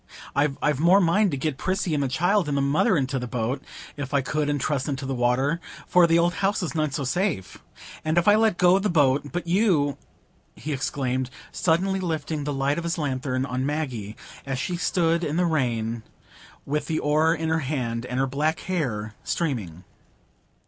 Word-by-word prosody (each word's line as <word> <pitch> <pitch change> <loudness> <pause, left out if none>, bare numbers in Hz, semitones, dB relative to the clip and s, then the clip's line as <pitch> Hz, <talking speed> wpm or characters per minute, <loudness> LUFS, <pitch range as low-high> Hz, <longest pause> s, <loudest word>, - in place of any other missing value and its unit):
I've 140 0 +1
more 175 +5 +6
mind 195 +3 +3
to 140 - -2
get 135 0 -2
Prissy 185 -3 -1
and 145 - +1
the 140 - +1
child 175 +7 +1
and 140 - 0
the - - +2
mother 155 +8 +3
into 135 -1 -1
the 125 - -4
boat, 125 +2 -2 0.3
if 145 -1 -4
I 140 - +4
could, 150 +3 -1
and 145 -1 0
trusten 140 0 -1
to 135 0 -6
the 135 - -2
water,—for 135 +8 +1
th' 165 0 +4
old 170 +1 +3
house 195 0 +1
is 170 - -3
none 155 -2 0
so 140 +1 -3
safe. 170 - -1 0.4
And 155 +1 0
if 170 - +3
I 205 - +8
let 215 -3 +3
go 180 +2 +5
the 210 +1 0
boat—but 145 +2 +1
you," 170 -6 +2 0.6
he 155 - -4
exclaimed, 130 -1 -2 0.2
suddenly 190 +3 +1
lifting 155 -4 -3
the 145 - -1
light 140 +3 0
of - - -5
his 170 +1 -2
lanthorn 130 -3 -1
on 130 -1 -2
Maggie, 130 -8 -3 0.3
as 135 -1 -3
she 175 +7 -2
stood 170 -1 +1
in 150 -1 -1
the 180 - +3
rain 120 -8 0 0.6
with 150 0 -2
the 160 - -1
oar 155 +3 +2
in 160 0 -2
her 160 0 +2
hand 125 -5 -2
and 125 +1 -2
her 135 - +3
black 150 +4 -1
hair 120 - -2
streaming. 105 - -3
150 Hz, 190 wpm, -25 LUFS, 130-170 Hz, 0.6 s, I